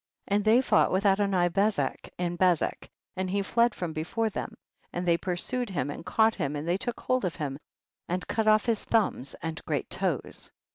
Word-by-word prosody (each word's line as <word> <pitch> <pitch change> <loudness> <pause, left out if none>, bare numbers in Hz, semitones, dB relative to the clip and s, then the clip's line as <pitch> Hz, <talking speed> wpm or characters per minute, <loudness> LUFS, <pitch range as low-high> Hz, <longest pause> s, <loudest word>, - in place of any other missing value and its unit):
5. - - 0
And 205 0 +1
they 225 +4 +6
fought - - +3
with 190 +2 +1
Adoni 195 -3 +3
bezek 205 +1 0
in 175 -1 -1
Bezek, 175 -2 +1 0.3
and 185 0 -2
he 200 +1 0
fled 235 +3 +2
from 170 -3 -4
be 155 -1 -2
fore 225 +6 -1
them, - - -5 0.3
and 175 +1 -3
they 170 - +5
pursued 195 +8 -2
him 145 -7 -2
and - - -7
caught 220 +5 +3
him, 140 +1 -2
and 145 +2 -4
they 175 +2 +2
took 235 +4 -4
hold 255 -2 +1
of 180 -3 -1
him 140 -3 -4 0.5
and 180 +1 -2
cut 220 -1 0
off 215 0 +5
his 230 -3 +1
thumbs 200 - 0
and 160 -1 -4
great - - -2
toes. - - -3
190 Hz, 205 wpm, -28 LUFS, 175-220 Hz, 0.5 s, they